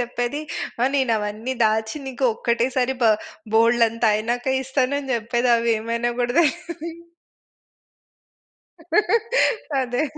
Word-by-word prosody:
చెప్పేది, 245 +3 -2 0.4
"ఆ - - +5
నేనవన్నీ 225 -2 -1
దాచి 220 +4 0
నీకు 265 0 -3
ఒక్కటే 235 +2 0
సారి 260 +1 +1
బ - - +5 0.5
బోలెడంత 230 0 +3
అయినాక 235 +4 -2 0.2
ఇస్తాను" 265 +1 0
అని 270 -2 -7
జెప్పేది 240 +2 0
అవేమైనా‌యోకూడ 235 +1 -1
తెలదీ. 335 +1 -2 2.9
అదే! 250 +1 -1
అదే! - - +1
240 Hz, 100 wpm, -22 LUFS, 230-260 Hz, 2.9 s, ఆ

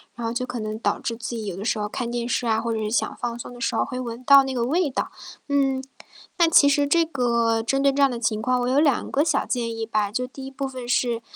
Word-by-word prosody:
然 235 -1 -5
后 230 - -2
就 250 +1 -2
可 245 - -5
能 215 0 -4
导 - - 0
致 230 - -3
自 235 +1 -5
己 220 -2 -5
有 190 -3 -4
的 195 - -6
时 225 - 0
候 210 0 -2
看 240 +2 -4
电 240 0 -3
视 240 -1 -1
啊， 220 0 +2
或 230 0 -2
者 220 - -2
是 210 -1 -2
想 230 - 0
放 240 -1 -3
松 245 - -8
的 240 - -11
时 230 - -1
候 - - +1
会 255 - -5
闻 240 0 -6
到 275 +1 +8
那 265 - -3
个 240 -2 -1
味 310 +5 +1
道。 - - -3 0.4
嗯， 270 -2 +1 0.6
那 335 - +5
其 295 -3 +6
实 285 0 +3
这 335 +2 +3
个 235 -6 +1
针 270 +4 0
对 275 -1 +4
这 285 - 0
样 275 - +6
的 240 - -4
情 220 -2 0
况， 250 +2 +1
我 245 - -1
有 260 +3 +3
2 285 -5 +1
个 285 +2 +2
小 305 -4 +1
建 230 -2 -2
议 225 - -2
吧。 215 -2 -1
就 250 +3 -1
第 265 +1 -10
一 270 - -8
部 275 0 -4
分 255 -2 -7
是， 240 -2 +1
245 Hz, 310 characters per minute, -24 LUFS, 230-270 Hz, 0.6 s, 到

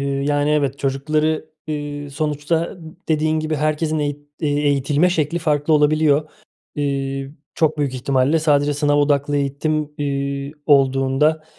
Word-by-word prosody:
yani, 140 +1 0
evet, 140 -2 +1
çocukları, 155 +3 -1 0.2
eee, 145 -1 -5
sonuçta, 155 +4 -2 0.3
dediğin 155 0 +1
gibi, 155 0 -2
herkesin 155 +1 0
eğit 145 -1 -2 0.2
eğitilme 145 +2 +2
şekli 160 -1 0
farklı 150 -1 0
olabiliyor. 150 0 +3 0.4
Eee, 135 -1 -2 0.2
çok 155 -1 +1
büyük 140 -3 -1
ihtimalle, 135 +4 +1
sadece 145 -2 +2
sınav 145 0 +1
odaklı 145 0 +2
eğitim, 150 +2 -1
eee, 140 0 -2
olduğunda, 135 +2 +3
145 Hz, 120 wpm, -20 LUFS, 140-155 Hz, 0.4 s, olabiliyor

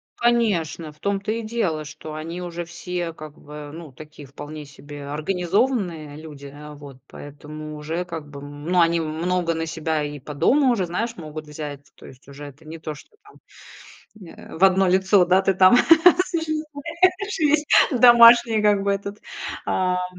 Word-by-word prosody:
Конечно! 200 -10 0
В 150 - -24
том-то 200 +1 -2
и 230 +1 -2
дело, 215 -9 -2
что 150 +1 -10
они 165 +3 -6
уже 175 0 -5
все, 175 0 -5
как 155 -2 -11
бы, 150 0 -10
ну, 165 -3 -10
такие 150 +1 -13
вполне 150 +2 -9
себе 145 0 -11
организованные 175 - -1
люди, 150 -2 -11
э. 150 +2 -11
Вот 140 -3 -12
поэтому 150 +1 -10
уже, 160 +4 -4
как 165 -4 -8
бы, 140 -1 -10
ну, 145 +5 -3
они 170 0 +2
много 165 +2 -1
на 165 0 -3
себя 160 -1 -2
и 145 0 -6
по 145 +2 -9
дому 270 - +3
уже, 200 -6 0
знаешь, 225 +7 -4
могут 155 -1 -8
взять. 145 -2 -8
То - - -16
есть 130 +1 -16
уже 140 +1 -10
это 145 +2 -14
не 160 +2 -8
то, 155 -1 -6
что 145 - -17
там, 420 - -19 0.9
э, - - -12
в - - +2
1 190 0 +4
лицо, 190 +1 +3
да, 185 +2 +3
ты 195 0 +1
там 185 +4 +6 0.5
существуешь, 335 +4 -2
есть 300 -1 +2 0.3
домашние, 235 -2 +7
как 205 -1 +2
бы, 200 - +1
этот, 200 +1 -5 0.5
ам 180 -1 0
165 Hz, 170 wpm, -22 LUFS, 150-200 Hz, 0.9 s, домашние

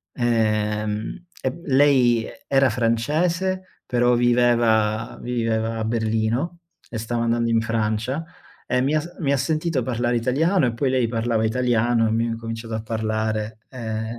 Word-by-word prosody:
ehm, 110 - 0 0.2
e 130 - +1
m 135 - -11
lei 130 -4 +4
e 280 - -11
era 135 -1 +4
francese, 165 +11 -1
però 120 0 +3
viveva 120 -3 +2
viveva 115 -2 -1
a 110 - -2
Berlino, 115 +8 -1 0.3
e 115 - -5
stava 115 +1 -2
andando 115 0 +1
in 115 0 +3
Francia, 115 +6 -1 0.4
e 125 - +1
mi 135 +4 +1
ha 155 - +3
s 175 +3 -10
mi 140 -5 0
ha - - +3
sentito 155 +1 0
parlare 120 0 0
italiano, 140 - +2
e 120 - 0
poi 130 +3 0
lei 130 -2 +2
parlava 115 -1 0
italiano, 120 0 +2
e - - +2
abbiamo 115 +1 0
incominciato 115 0 -5
a 110 - -3
parlare 110 -1 -2
ehm 110 -2 -5
120 Hz, 155 wpm, -23 LUFS, 110-130 Hz, 0.4 s, lei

